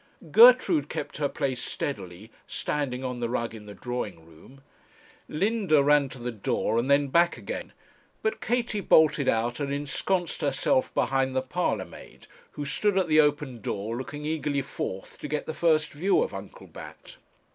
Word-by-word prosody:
Gertrude 220 - +6
kept - - -5
her 145 -2 0
place 130 -4 -2
steadily 100 -4 -5 0.2
standing 135 -3 -3
on 125 -1 -4
the 120 -1 -2
rug 115 -1 -2
in 105 -2 -11
the 105 - -9
drawing 105 -9 -5
room; 85 +12 -17 0.7
Linda 190 -4 +2
ran 145 -1 +4
to - - -9
the 120 0 -4
door 110 +1 -1
and 125 +4 -2
then 140 0 +3
back 170 +2 +3
again; 110 - -6 0.5
but 220 - -1
Katie 235 -3 -1
bolted 155 -5 +4
out 115 +3 0
and 140 -1 -2
ensconced 150 +5 -1
herself 255 - +1
behind 135 -1 +1
the 130 - +1
parlour 130 - -1
maid, - - -14 0.3
who 145 - -5
stood 195 +7 +1
at 185 -3 +1
the 155 0 +5
open 145 -5 +1
door, 105 +3 -3
looking 145 +4 -6
eagerly 150 -3 -1
forth 95 -7 -6
to - - -5
get 150 0 -2
the 160 - -4
first 155 -2 +2
view 185 - +2
of - - -5
Uncle - - -9
Bat. - - -12
140 Hz, 170 wpm, -27 LUFS, 120-160 Hz, 0.7 s, Gertrude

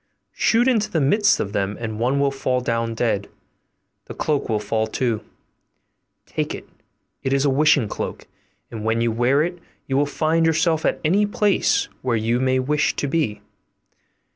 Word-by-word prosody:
Shoot 235 +2 +2
into 225 -5 +2
the 165 - 0
midst 205 +9 +3
of 100 - -3
them, 100 +1 -1
and 110 -2 -5
one 130 +4 +1
will 140 0 +2
fall 130 -2 -1
down 115 -2 -2
dead: 110 -4 -1 0.8
the - - -9
cloak 150 -5 -1
will 110 - +1
fall 110 +1 -1
too; 115 -1 -1 1.0
take - - -3
it, - - -11 0.5
it 130 - -2
is 140 +1 +2
a 140 - +3
wishing 145 -3 +3
cloak, - - -5 0.5
and 110 -2 -6
when 110 +1 +1
you 115 0 +1
wear 125 +6 +2
it 175 +1 -4 0.3
you 135 - -2
will 145 +1 +2
find 160 +3 +1
yourself 160 0 +1
at - - 0
any 200 +6 +3
place 205 -1 +1
where 125 -3 0
you 115 +3 0
may 130 0 +2
wish 145 +3 +1
to - - -2
be. 140 -8 -1
135 Hz, 175 wpm, -22 LUFS, 115-155 Hz, 1.0 s, midst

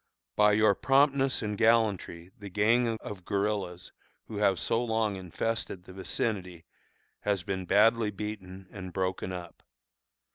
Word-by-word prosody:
By 105 0 +5
your 110 0 +5
promptness 135 +2 +2
and 105 -1 -2
gallantry 105 -6 +1
the 100 -2 -9
gang 115 +4 +2
of 100 -3 -8
guerillas 100 -3 -2 0.3
who 110 - -7
have 100 -3 +2
so 115 +7 0
long 110 -3 0
infested 95 +1 -3
the 95 - -12
vicinity 95 -2 -3 0.5
has 100 -3 -1
been 95 0 -3
badly 110 +3 +4
beaten 95 -2 -7
and 95 -3 -8
broken 95 -1 -2
up. 90 -2 -8
100 Hz, 135 wpm, -29 LUFS, 95-110 Hz, 0.5 s, By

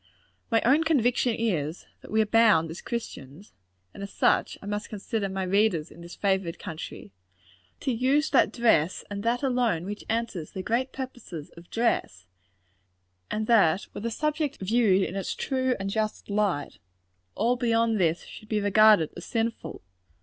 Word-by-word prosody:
My 225 -1 +2
own 285 +6 +4
conviction 250 -6 +2
is, 175 -8 -2 0.2
that - - -13
we 220 +1 +3
are - - -4
bound, 210 -7 +4
as 170 - -8
Christians 195 - -7 0.4
and - - -10
as 200 - -6
such, - - +1
I - - -12
must 205 0 -4
consider 210 0 -3
my 190 0 -3
readers 185 -4 +1
in 170 - -13
this 170 +1 -10
favored 190 -4 0
country 160 - -8 0.7
to 270 - 0
use 265 +6 +2
that - - +4
dress, 185 -8 +2
and 200 0 -4
that 235 +4 0
alone, 245 -10 +1
which 205 +2 -6
answers 225 -8 -3
the 190 - -5
great 245 +6 0
purposes 245 - -7
of 170 0 -15
dress; 95 - -1 1.0
and 215 0 -2
that 200 -6 +4
were - - -6
the 230 - -2
subject 300 +3 -1
viewed 200 -1 +3
in 190 - -4
its 195 - -3
true 260 -1 0
and 195 0 -3
just 215 -1 -2
light, 200 -8 -1 0.6
all 235 +4 +2
beyond 230 -3 +1
this 170 -2 +1
should 215 - -12
be 215 - +1
regarded 205 -4 +5
as 175 - -8
sinful. 230 0 -3
215 Hz, 165 wpm, -27 LUFS, 185-235 Hz, 1.0 s, regarded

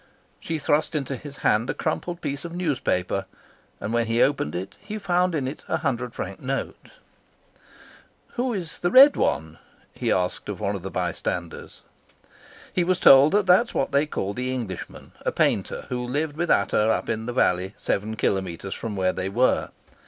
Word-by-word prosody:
She 165 - -3
thrust 150 +1 +1
into 140 -2 -2
his 140 +2 -10
hand 110 +4 +3
a - - -1
crumpled 175 -1 -3
piece 140 -2 -4
of 170 0 -7
newspaper, 140 - -1 0.5
and 110 - -4
when 120 -1 +1
he 115 +1 0
opened 135 - 0
it 90 +2 -5
he 215 +1 -6
found 180 -3 +1
in 135 -4 -1
it 135 - -6
a - - 0
hundred 125 -4 -2
franc 95 +1 -5
note. 135 +1 -4 1.4
"Who 250 0 -2
is 180 -7 -4
the 175 - +1
Red 275 +7 +8
One?" 80 0 -1 0.3
he - - -1
asked 90 +2 -1
of 100 - -4
one 100 -1 -1
of 95 - -5
the 95 - -5
bystanders. 90 -2 -4 0.9
He 180 - +2
was 185 +1 +1
told 135 +3 +8
that 205 -1 +3
that 180 +2 +6
was - - -13
what - - 0
they 140 +2 +2
called 100 -7 -3
the 125 +1 -2
Englishman, 115 -8 -6
a - - 0
painter, - - 0
who 125 -1 -2
lived 145 +3 -2
with 170 +2 -2
Ata 105 +2 +3
up - - 0
in 110 +1 -2
the - - -1
valley 95 -4 +1
seven 110 +2 -2
kilometres 95 -2 -2
from 110 -3 -5
where 95 -1 +1
they 95 - -3
were. 125 +6 +2
130 Hz, 185 wpm, -24 LUFS, 100-160 Hz, 1.4 s, Red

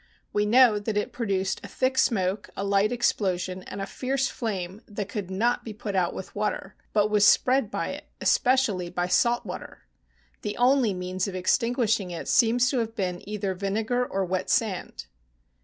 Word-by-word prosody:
We 210 0 +1
know 235 -2 +6
that 210 0 -3
it 210 - -1
pro 230 -2 -3
duced 195 -1 -1
a - - -6
thick 260 0 0
smoke, 200 -5 +1
a - - -2
light 200 +2 +2
explosion, 185 -6 0
and - - -7
a 195 - -2
fierce 265 +5 -1
flame 195 -3 -4
that 205 -2 -5
could 205 -3 -4
not 225 +6 0
be 220 - -7
put 210 -1 -5
out 180 -2 +1
with 190 - -7
water, 210 -2 -2 0.2
but 210 0 +2
was 210 -1 +4
spread 250 +2 +4
by - - -3
it, - - -7
especially 235 -9 +2
by 175 0 -1
salt 240 +6 +2
water. 180 - -8 0.6
The 210 - -4
only 245 -4 +3
means 185 +2 -2
of 195 - -5
extinguishing 225 +1 +1
it 170 -1 -6
seems 245 +1 +4
to 260 - +1
have 225 -1 -3
been 180 -3 -2
either 205 -2 -2
vinegar 215 +6 -1
or 195 -5 -2
wet 185 +1 -2
sand. 205 - -1
210 Hz, 185 wpm, -26 LUFS, 190-235 Hz, 0.6 s, know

